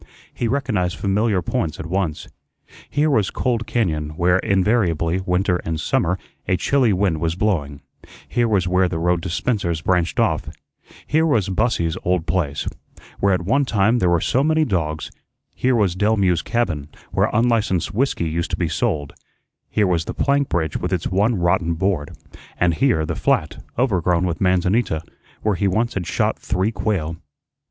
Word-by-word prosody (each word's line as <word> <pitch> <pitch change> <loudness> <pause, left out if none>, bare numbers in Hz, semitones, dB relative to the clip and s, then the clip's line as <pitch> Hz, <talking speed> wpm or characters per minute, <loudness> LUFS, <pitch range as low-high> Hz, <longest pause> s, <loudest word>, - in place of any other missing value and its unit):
He 120 - -2
recognized 110 -9 0
familiar 100 -1 +1
points 80 -2 -2
at 80 - -5
once. 90 -2 -2 0.6
Here 150 +1 +1
was 110 -8 +2
Cold 115 -4 -1
cañón, 80 -10 -1
where 90 +1 +3
invariably, 95 -4 +1
winter 90 0 +1
and 80 -2 -4
summer, 90 +3 +1 0.3
a 95 - +2
chilly 130 +4 +2
wind 95 -4 +1
was 85 0 0
blowing; 85 -8 -1 0.5
here 120 -1 +1
was 100 -5 +1
where 90 0 +2
the 85 - -3
road 85 +1 +1
to 95 - -4
Spencer's 85 -4 -1
branched 90 0 +1
off; - - +1 0.6
here 160 +2 +2
was 110 - +1
Bussy's 90 -4 0
old 90 -2 0
place, 80 -6 -1 0.5
where 100 - +3
at 90 -2 +1
one 135 +10 +2
time 115 -1 +2
there 90 - +2
were 85 -1 +3
so 130 - +1
many 155 +1 +3
dogs; 80 - -2 0.4
here 130 0 +1
was 100 -6 +2
Delmue's 95 -4 +2
cabin, 80 -12 -2 0.2
where - - +2
unlicensed 115 -6 +1
whiskey 115 -7 0
used 85 +3 -2
to - - -2
be 85 - 0
sold; 75 -2 -1 0.6
here 105 - +2
was 85 -3 +1
the - - -5
plank 140 0 +1
bridge 80 -3 -1
with - - -3
its 90 -3 -1
one 105 +5 +2
rotten 85 -2 +1
board; 90 -4 -1 0.4
and 90 -1 +2
here 95 -6 +2
the - - -2
flat - - 0
overgrown 90 -8 +2
with 85 -2 -3
manzanita, 90 -1 +1 0.4
where 105 - +2
he 100 +2 0
once 115 +5 0
had 90 -4 -3
shot - - 0
three 95 +3 0
quail. 85 -8 -2
95 Hz, 170 wpm, -21 LUFS, 85-110 Hz, 0.6 s, where